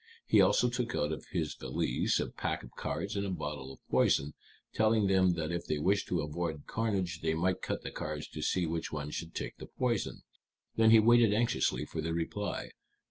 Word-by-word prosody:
He -, -, +5 dB
also 125 Hz, -, +4 dB
took 120 Hz, 0 st, -2 dB
out 75 Hz, +1 st, 0 dB
of 75 Hz, -4 st, -5 dB
his -, -, -2 dB
valise -, -, 0 dB
a -, -, 0 dB
pack -, -, -3 dB
of -, -, -11 dB
cards 100 Hz, +2 st, -4 dB
and 100 Hz, -, 0 dB
a 100 Hz, -, -2 dB
bottle 75 Hz, -6 st, -4 dB
of -, -, -16 dB
poison, 70 Hz, +2 st, +2 dB, 0.4 s
telling 110 Hz, -1 st, +3 dB
them 95 Hz, -2 st, +4 dB
that 80 Hz, -1 st, -3 dB
if 85 Hz, 0 st, -3 dB
they 75 Hz, -, 0 dB
wished 95 Hz, +7 st, +1 dB
to 90 Hz, -, 0 dB
avoid 75 Hz, 0 st, -3 dB
carnage 95 Hz, -7 st, -1 dB
they 80 Hz, 0 st, +1 dB
might 90 Hz, +3 st, 0 dB
cut -, -, -3 dB
the -, -, -5 dB
cards 75 Hz, -1 st, -5 dB
to 75 Hz, -, -7 dB
see 90 Hz, +3 st, +1 dB
which 80 Hz, 0 st, -3 dB
one 75 Hz, -1 st, -4 dB
should 85 Hz, +1 st, -6 dB
take -, -, -4 dB
the -, -, -8 dB
poison. 120 Hz, -4 st, -2 dB, 0.5 s
Then 110 Hz, 0 st, +5 dB
he 110 Hz, 0 st, +8 dB
waited 115 Hz, -1 st, +5 dB
anxiously 115 Hz, +2 st, +1 dB
for 80 Hz, -, -4 dB
their 80 Hz, +1 st, -2 dB
reply. 100 Hz, +5 st, -3 dB
85 Hz, 205 wpm, -32 LUFS, 75-105 Hz, 0.5 s, he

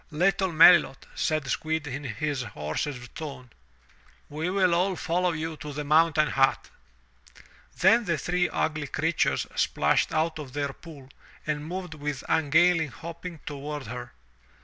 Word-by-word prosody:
''Little 185 Hz, +4 st, +1 dB
Melilot/' 165 Hz, -3 st, +6 dB
said 155 Hz, -3 st, -1 dB
Squill 160 Hz, +3 st, -1 dB
in 140 Hz, +1 st, -5 dB
his 140 Hz, +4 st, -2 dB
hoarsest 120 Hz, -, -5 dB
tone, 135 Hz, -6 st, -8 dB, 0.8 s
we 155 Hz, +4 st, -3 dB
will 185 Hz, -2 st, +2 dB
all 185 Hz, +2 st, +1 dB
follow 180 Hz, +1 st, 0 dB
you 160 Hz, 0 st, -4 dB
to 150 Hz, -1 st, -7 dB
the 150 Hz, +1 st, -4 dB
mountain 155 Hz, 0 st, +3 dB
hut." 135 Hz, 0 st, +1 dB, 1.1 s
Then 225 Hz, +6 st, +4 dB
the 170 Hz, -4 st, 0 dB
three 180 Hz, +3 st, 0 dB
ugly 155 Hz, -2 st, -1 dB
creatures 160 Hz, +4 st, 0 dB
splashed -, -, +1 dB
out 160 Hz, 0 st, 0 dB
of 135 Hz, -4 st, -8 dB
their 140 Hz, -1 st, -2 dB
pool 145 Hz, -6 st, -13 dB, 0.4 s
and 150 Hz, -1 st, -2 dB
moved 180 Hz, 0 st, -5 dB
with 145 Hz, -3 st, -5 dB
ungainly 160 Hz, +2 st, +3 dB
hopping 165 Hz, +3 st, -9 dB
toward 145 Hz, -1 st, -5 dB
her. 125 Hz, +3 st, -7 dB
155 Hz, 140 wpm, -27 LUFS, 145-170 Hz, 1.1 s, Melilot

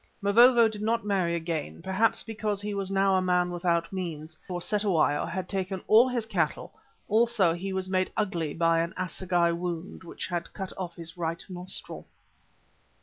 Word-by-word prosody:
Mavovo 235 Hz, +3 st, +6 dB
did 215 Hz, -1 st, -6 dB
not 225 Hz, +1 st, 0 dB
marry 185 Hz, -4 st, +1 dB
again, 165 Hz, -1 st, -4 dB
perhaps 190 Hz, +5 st, +1 dB
because 215 Hz, -2 st, -3 dB
he 205 Hz, 0 st, -4 dB
was 195 Hz, -1 st, -2 dB
now 195 Hz, 0 st, +2 dB
a 185 Hz, -, +3 dB
man 180 Hz, -1 st, +1 dB
without 170 Hz, 0 st, 0 dB
means, 160 Hz, -4 st, -5 dB
for 180 Hz, -1 st, -3 dB
Cetewayo 180 Hz, -7 st, +1 dB
had 180 Hz, +2 st, -4 dB
taken 190 Hz, -1 st, -3 dB
all 230 Hz, +4 st, +6 dB
his 240 Hz, -3 st, -1 dB
cattle; 225 Hz, -, -1 dB, 0.3 s
also 220 Hz, -5 st, +3 dB
he 190 Hz, +3 st, -4 dB
was 190 Hz, 0 st, -2 dB
made 185 Hz, 0 st, 0 dB
ugly 175 Hz, -8 st, -1 dB
by 165 Hz, 0 st, +3 dB
an 170 Hz, +2 st, -2 dB
assegai 180 Hz, -1 st, 0 dB
wound 175 Hz, +1 st, -4 dB
which 165 Hz, -, -6 dB
had 175 Hz, -2 st, -4 dB
cut 190 Hz, -2 st, -6 dB
off 175 Hz, -2 st, -5 dB
his 170 Hz, 0 st, -7 dB
right 165 Hz, -1 st, -3 dB
nostril. 180 Hz, 0 st, -6 dB
185 Hz, 170 wpm, -28 LUFS, 170-205 Hz, 0.3 s, Mavovo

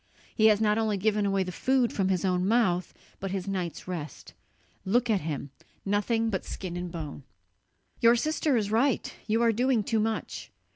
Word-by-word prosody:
He 220 Hz, -1 st, +4 dB
has 210 Hz, -1 st, +5 dB
not 215 Hz, 0 st, +2 dB
only 215 Hz, -2 st, 0 dB
given 210 Hz, +1 st, +1 dB
away 195 Hz, -1 st, +1 dB
the 180 Hz, -, -5 dB
food 255 Hz, +4 st, +1 dB
from 190 Hz, -2 st, 0 dB
his 185 Hz, -1 st, 0 dB
own 180 Hz, 0 st, +1 dB
mouth, 190 Hz, -6 st, +2 dB, 0.3 s
but 195 Hz, -, -4 dB
his 190 Hz, 0 st, -3 dB
night's 185 Hz, -4 st, -4 dB
rest. 165 Hz, -5 st, -6 dB, 0.5 s
Look 235 Hz, +4 st, +2 dB
at 200 Hz, -4 st, +2 dB
him, 145 Hz, -3 st, -4 dB, 0.3 s
nothing 225 Hz, +3 st, +1 dB
but 190 Hz, -, -2 dB
skin 180 Hz, -2 st, -6 dB
and 175 Hz, 0 st, -4 dB
bone!" 155 Hz, -4 st, -6 dB, 0.8 s
"Your 235 Hz, +1 st, +6 dB
sister 300 Hz, +1 st, +1 dB
is 210 Hz, -2 st, -1 dB
right, 240 Hz, +4 st, +1 dB
you 225 Hz, +2 st, +2 dB
are 230 Hz, -, +4 dB
doing 245 Hz, 0 st, +1 dB
too 225 Hz, +2 st, 0 dB
much. 220 Hz, +1 st, -3 dB
205 Hz, 185 wpm, -28 LUFS, 185-230 Hz, 0.8 s, Your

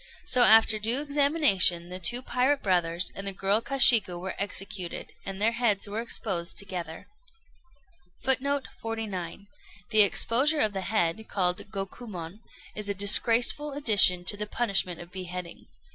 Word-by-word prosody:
So, 250 Hz, -, +2 dB
after 220 Hz, -2 st, +6 dB
due 230 Hz, +5 st, +1 dB
examination, 280 Hz, -, +3 dB
the 185 Hz, +1 st, -7 dB
two 240 Hz, +8 st, -2 dB
pirate 260 Hz, +3 st, 0 dB
brothers 175 Hz, -2 st, 0 dB
and 195 Hz, 0 st, -7 dB
the -, -, -1 dB
girl 195 Hz, +3 st, 0 dB
Kashiku 230 Hz, -9 st, +3 dB
were 190 Hz, +1 st, -6 dB
executed, 195 Hz, -2 st, -5 dB
and 195 Hz, 0 st, -6 dB
their 220 Hz, +2 st, +2 dB
heads 230 Hz, -4 st, -1 dB
were 210 Hz, +3 st, -4 dB
exposed 190 Hz, -7 st, -2 dB
together. 180 Hz, -5 st, -5 dB, 1.2 s
[Footnote 275 Hz, +1 st, 0 dB
49: 205 Hz, -5 st, -6 dB, 0.5 s
The 215 Hz, -, +6 dB
exposure 260 Hz, +9 st, +2 dB
of 215 Hz, -1 st, +1 dB
the 190 Hz, -, -4 dB
head, 205 Hz, +1 st, -2 dB
called 180 Hz, 0 st, -2 dB
Gokumon, 195 Hz, -2 st, -8 dB, 0.3 s
is 210 Hz, -1 st, -4 dB
a 200 Hz, -, -2 dB
disgraceful 230 Hz, +8 st, +3 dB
addition 205 Hz, -10 st, +4 dB
to 205 Hz, -, -1 dB
the 210 Hz, +1 st, -5 dB
punishment 195 Hz, -7 st, -2 dB
of 175 Hz, 0 st, -12 dB
beheading. 180 Hz, -2 st, -8 dB
205 Hz, 145 wpm, -26 LUFS, 185-235 Hz, 1.2 s, after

